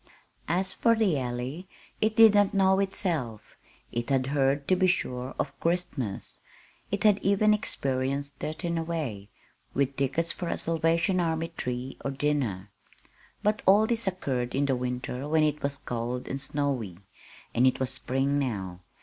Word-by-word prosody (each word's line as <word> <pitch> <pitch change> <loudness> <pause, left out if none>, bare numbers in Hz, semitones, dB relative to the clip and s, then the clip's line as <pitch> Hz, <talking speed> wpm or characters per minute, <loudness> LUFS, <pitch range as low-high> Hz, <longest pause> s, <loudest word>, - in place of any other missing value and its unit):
As 185 +3 0
for 230 -1 +3
the 200 -10 +2
Alley 125 +8 -4 0.3
it 220 0 +2
did 225 -2 +8
not 205 0 +3
know 190 0 +4
itself. 165 - -2 0.4
It 120 +2 -3
had 135 -2 +2
heard, 140 0 +1
to 185 - +5
be 185 0 +3
sure, 125 -7 -1
of - - -3
Christmas. 165 - -2 0.5
It 200 - -2
had 210 -2 +5
even 200 +2 +3
experienced 140 -7 -1
it, 155 +4 -4
in 170 -1 0
a - - -1
way, 135 -12 -4 0.5
with 140 0 +1
tickets 150 +5 +1
for 175 - -5
a - - -1
Salvation 165 +3 +1
Army 165 -1 0
tree 125 +1 -4
or - - -1
dinner. 135 -9 -1 0.7
But 210 +1 +1
all 205 +3 +7
this 230 -2 -1
occurred 130 -10 -2
in 140 +1 +2
the 135 -2 +1
winter 125 +2 -3
when 155 0 +3
it 150 0 0
was 140 0 -1
cold 120 0 -4
and 135 +1 -3
snowy; 135 -10 -2 0.6
and 125 +2 +4
it 130 - +1
was 130 -1 0
spring 135 +2 0
now. 95 -9 -3
145 Hz, 165 wpm, -28 LUFS, 125-180 Hz, 0.7 s, did